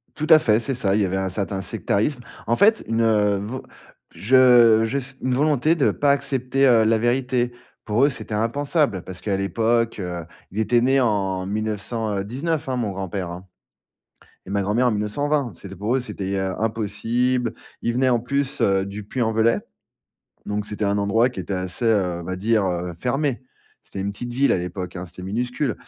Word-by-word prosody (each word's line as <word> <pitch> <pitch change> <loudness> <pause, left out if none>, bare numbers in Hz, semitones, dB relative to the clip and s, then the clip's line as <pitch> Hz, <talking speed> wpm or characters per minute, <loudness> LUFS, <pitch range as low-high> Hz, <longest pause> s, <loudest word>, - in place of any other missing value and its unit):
Tout 155 0 -3
à 155 -1 +9
fait, 110 -5 +3
c'est 135 +3 -2
ça, 100 -5 0
il 105 - +2
y - - +3
avait 95 +1 -1
un 95 0 -1
certain 95 0 -3
sectarisme. 120 +8 -1 0.3
En 115 - +2
fait, 220 - +4
une 110 -3 +2
vo 110 +6 -5 0.5
je 120 -1 +6
juste, 135 +2 -3
une 130 -1 0
volonté 150 +3 +2
de 145 - +2
pas 145 -1 +2
accepter, 135 -1 +1
heu, 115 -3 +5
la 110 +1 +3
vérité. 120 +1 0 0.3
Pour 115 +6 +3
eux, - - +3
c'était 115 -4 -5
impensable 120 - 0
parce 90 -1 -9
qu'à 100 -2 -1
l'époque, 115 +3 0
heu, 90 -2 -4 0.3
il 105 - -4
était 120 +2 +3
né 135 +2 +3
en 95 -6 0
1900, 110 +1 -3
heu, 95 - -1
19, 150 +6 -2
hein, 130 - 0
mon 115 -5 -1
grand-père, 95 -1 -4
hein, 90 +2 -8 1.0
et 95 - -8
ma 100 0 +1
grand-mère 110 +6 +1
en - - +2
1920. 125 +5 -1
C'était 95 -1 -10
pour 105 +7 -1
eux, - - +2
c'était, 100 -4 -4
heu, 95 -1 -1
impossible. 115 +3 0 0.3
Ils 120 - -1
venaient 130 +1 +2
en 120 -2 +3
plus, 140 +3 -2
heu, 95 0 +2
du 100 +1 -7
Puy-en-Velay, 115 -1 +1 0.9
donc 105 0 -2
c'était 105 0 -4
un 100 +1 +1
endroit 115 +5 +3
qui 110 -7 -6
était 95 +2 -4
assez, 90 +5 -3
heu, 90 -6 +1
on - - -8
va 95 +1 -4
dire, 105 +1 +1
heu, 90 -1 -2
fermé. 135 - -1 0.4
C'était 95 - -8
une 100 +1 -2
petite 120 +4 -6
ville 135 +3 +3
à - - +2
l'époque, 90 +1 -5
hein, 90 +1 -6
c'était 90 +2 -11
minuscule 125 +7 -2
115 Hz, 195 wpm, -22 LUFS, 100-125 Hz, 1.0 s, à